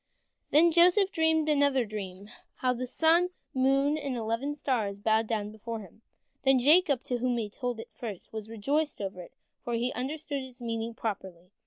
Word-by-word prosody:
Then 330 Hz, +3 st, +5 dB
Joseph 360 Hz, +4 st, +5 dB
dreamed 320 Hz, -2 st, +2 dB
another 285 Hz, -4 st, +3 dB
dream, 200 Hz, -2 st, -7 dB, 0.3 s
how 255 Hz, -1 st, +1 dB
the 250 Hz, +1 st, -4 dB
sun, 330 Hz, +6 st, +3 dB, 0.2 s
the 260 Hz, -, -3 dB
moon, 275 Hz, +3 st, +3 dB
and 275 Hz, -4 st, -3 dB
eleven 230 Hz, +6 st, -2 dB
stars 225 Hz, -9 st, -1 dB
bowed 220 Hz, +2 st, +1 dB
down 210 Hz, -2 st, -2 dB
before 220 Hz, +1 st, -6 dB
him, 200 Hz, +2 st, -15 dB, 0.4 s
and 270 Hz, -1 st, +5 dB
Jacob, 295 Hz, 0 st, +4 dB
to 245 Hz, -1 st, -2 dB
whom 245 Hz, 0 st, 0 dB
he 215 Hz, -3 st, -3 dB
told 245 Hz, -1 st, -4 dB
it -, -, -10 dB
first, 215 Hz, -5 st, -8 dB
was 220 Hz, -1 st, -6 dB
rejoiced 280 Hz, +8 st, -1 dB
over 190 Hz, -2 st, -5 dB
it, 175 Hz, -, -13 dB, 0.3 s
for 240 Hz, -, -2 dB
he 240 Hz, +2 st, -1 dB
understood 285 Hz, +2 st, -3 dB
its 260 Hz, -1 st, -10 dB
meaning 230 Hz, -1 st, -3 dB
properly. 190 Hz, -6 st, -5 dB
245 Hz, 180 wpm, -29 LUFS, 220-285 Hz, 0.4 s, Then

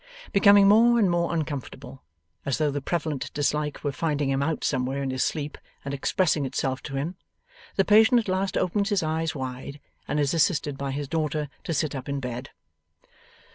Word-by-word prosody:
Becoming 200 Hz, 0 st, +7 dB
more 230 Hz, +4 st, +6 dB
and 200 Hz, -6 st, +3 dB
more 170 Hz, 0 st, +1 dB
uncomfortable, 140 Hz, -4 st, -5 dB, 0.4 s
as 140 Hz, -, -1 dB
though 150 Hz, -2 st, +1 dB
the 145 Hz, 0 st, -3 dB
prevalent 155 Hz, -2 st, -2 dB
dislike 150 Hz, 0 st, -1 dB
were 145 Hz, -, 0 dB
finding 145 Hz, -1 st, -1 dB
him 135 Hz, 0 st, 0 dB
out 155 Hz, +2 st, -1 dB
somewhere 135 Hz, +1 st, -1 dB
in 135 Hz, -, -2 dB
his 130 Hz, 0 st, 0 dB
sleep 150 Hz, -1 st, -3 dB, 0.3 s
and 140 Hz, -, -3 dB
expressing 155 Hz, +2 st, +1 dB
itself 135 Hz, 0 st, -2 dB
to 135 Hz, -, -7 dB
him, 160 Hz, +7 st, -3 dB, 0.6 s
the 195 Hz, -, +2 dB
patient 220 Hz, +4 st, +6 dB
at 225 Hz, -, -4 dB
last 190 Hz, +1 st, 0 dB
opens 200 Hz, +3 st, 0 dB
his 205 Hz, -5 st, +1 dB
eyes 160 Hz, 0 st, -1 dB
wide, 130 Hz, +1 st, -6 dB, 0.3 s
and 150 Hz, -, -1 dB
is 145 Hz, +1 st, +1 dB
assisted 155 Hz, -3 st, +1 dB
by 140 Hz, 0 st, -4 dB
his 140 Hz, +1 st, -3 dB
daughter 150 Hz, -1 st, -1 dB, 0.2 s
to -, -, -3 dB
sit 150 Hz, 0 st, 0 dB
up 135 Hz, 0 st, -6 dB
in 140 Hz, 0 st, -1 dB
bed. 125 Hz, -1 st, -5 dB
150 Hz, 185 wpm, -26 LUFS, 135-175 Hz, 0.6 s, Becoming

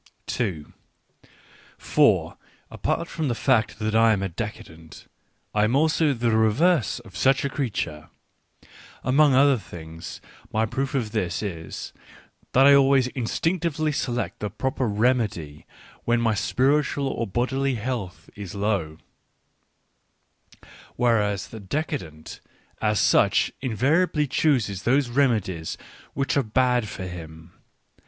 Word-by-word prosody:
For, -, -, +2 dB, 0.4 s
apart -, -, -2 dB
from 155 Hz, -, -3 dB
the 120 Hz, -, -1 dB
fact 115 Hz, -2 st, +1 dB
that 110 Hz, 0 st, -2 dB
I 115 Hz, 0 st, +5 dB
am 100 Hz, -2 st, -1 dB
a 95 Hz, -, -2 dB
decadent, 80 Hz, -5 st, -8 dB, 0.5 s
I 105 Hz, -, +2 dB
am 115 Hz, +4 st, +1 dB
also 155 Hz, +1 st, +3 dB
the 120 Hz, 0 st, 0 dB
reverse 115 Hz, -, +2 dB
of 95 Hz, -5 st, -16 dB
such 135 Hz, +4 st, +2 dB
a -, -, 0 dB
creature. 95 Hz, -, -3 dB, 0.9 s
Among 140 Hz, +2 st, +4 dB
other 135 Hz, -1 st, +5 dB
things 80 Hz, -3 st, -9 dB, 0.3 s
my 110 Hz, -1 st, +1 dB
proof 135 Hz, +5 st, -3 dB
of 115 Hz, -5 st, -1 dB
this 95 Hz, -4 st, -2 dB
is, 85 Hz, -5 st, -6 dB, 0.6 s
that 135 Hz, +1 st, +6 dB
I 140 Hz, -, +8 dB
always 135 Hz, -2 st, +4 dB
instinctively 155 Hz, +5 st, -1 dB
select 120 Hz, -4 st, -3 dB
the 105 Hz, -, -3 dB
proper 130 Hz, +4 st, -2 dB
remedy 105 Hz, -, -1 dB, 0.4 s
when 120 Hz, 0 st, +2 dB
my 115 Hz, -2 st, +2 dB
spiritual 140 Hz, +5 st, +1 dB
or 115 Hz, -3 st, -2 dB
bodily 130 Hz, +5 st, 0 dB
health 115 Hz, -5 st, -5 dB
is 100 Hz, -2 st, -8 dB
low; 100 Hz, -7 st, -1 dB, 2.0 s
whereas 105 Hz, -5 st, +1 dB
the 110 Hz, -, -9 dB
de 110 Hz, +11 st, -2 dB
cadent, 80 Hz, -, -7 dB, 0.4 s
as 105 Hz, -1 st, +1 dB
such, -, -, +3 dB
invariably 150 Hz, -, +1 dB
chooses 125 Hz, -9 st, +1 dB
those 130 Hz, +1 st, +2 dB
remedies 110 Hz, -, 0 dB, 0.4 s
which 135 Hz, -1 st, 0 dB
are -, -, +4 dB
bad 125 Hz, 0 st, +1 dB
for 95 Hz, -2 st, -6 dB
him. 80 Hz, -1 st, -9 dB
115 Hz, 125 wpm, -24 LUFS, 100-135 Hz, 2.0 s, I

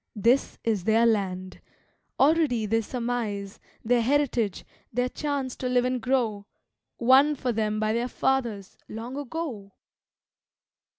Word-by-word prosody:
This 235 Hz, +6 st, +2 dB
is 210 Hz, -6 st, 0 dB
their 225 Hz, +1 st, +4 dB
land. 185 Hz, -4 st, -1 dB, 0.6 s
Already 280 Hz, -6 st, +3 dB
they 225 Hz, +2 st, +1 dB
surmise 225 Hz, -4 st, -3 dB, 0.3 s
Their 240 Hz, +1 st, +3 dB
heritage, 245 Hz, -6 st, 0 dB, 0.3 s
their 250 Hz, +2 st, 0 dB
chance 280 Hz, -3 st, -3 dB
to 255 Hz, -, -3 dB
live 250 Hz, 0 st, +2 dB
and 255 Hz, -1 st, -1 dB
grow, 225 Hz, -5 st, 0 dB, 0.5 s
Won 265 Hz, +5 st, +5 dB
for 255 Hz, -2 st, -2 dB
them 215 Hz, -1 st, -1 dB
by 215 Hz, 0 st, +1 dB
their 235 Hz, +2 st, 0 dB
fathers, 235 Hz, -7 st, -1 dB
long 230 Hz, +4 st, -6 dB
ago! 275 Hz, -8 st, -5 dB
235 Hz, 125 wpm, -26 LUFS, 215-260 Hz, 0.6 s, Won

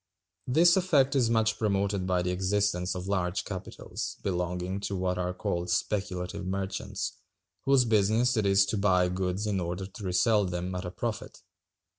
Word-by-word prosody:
This 165 Hz, +7 st, +5 dB
effect 145 Hz, -7 st, +3 dB
is 125 Hz, -4 st, +3 dB
much 110 Hz, -1 st, +1 dB
promoted 100 Hz, -2 st, 0 dB
by 90 Hz, -1 st, +1 dB
the 90 Hz, -, -1 dB
existence 95 Hz, -1 st, 0 dB
of 90 Hz, 0 st, -5 dB
large 95 Hz, -1 st, -1 dB
capitals, 95 Hz, -3 st, -6 dB
belonging 90 Hz, +1 st, -2 dB
to 100 Hz, 0 st, -3 dB
what 90 Hz, -1 st, -1 dB
are 90 Hz, 0 st, -1 dB
called 90 Hz, -1 st, -3 dB
speculative 90 Hz, 0 st, -2 dB
merchants, 95 Hz, +1 st, -3 dB, 0.5 s
whose 135 Hz, -2 st, +5 dB
business 110 Hz, +3 st, +3 dB
it 110 Hz, -3 st, +1 dB
is 95 Hz, 0 st, +5 dB
to 105 Hz, -, -2 dB
buy 90 Hz, -3 st, +3 dB
goods 95 Hz, +2 st, -2 dB
in 100 Hz, -3 st, 0 dB
order 90 Hz, +2 st, -3 dB
to 100 Hz, +2 st, -10 dB
resell 100 Hz, +3 st, +3 dB
them 90 Hz, 0 st, -3 dB
at 90 Hz, +1 st, -4 dB
a -, -, -3 dB
profit. 110 Hz, +4 st, -5 dB
95 Hz, 165 wpm, -28 LUFS, 90-105 Hz, 0.5 s, This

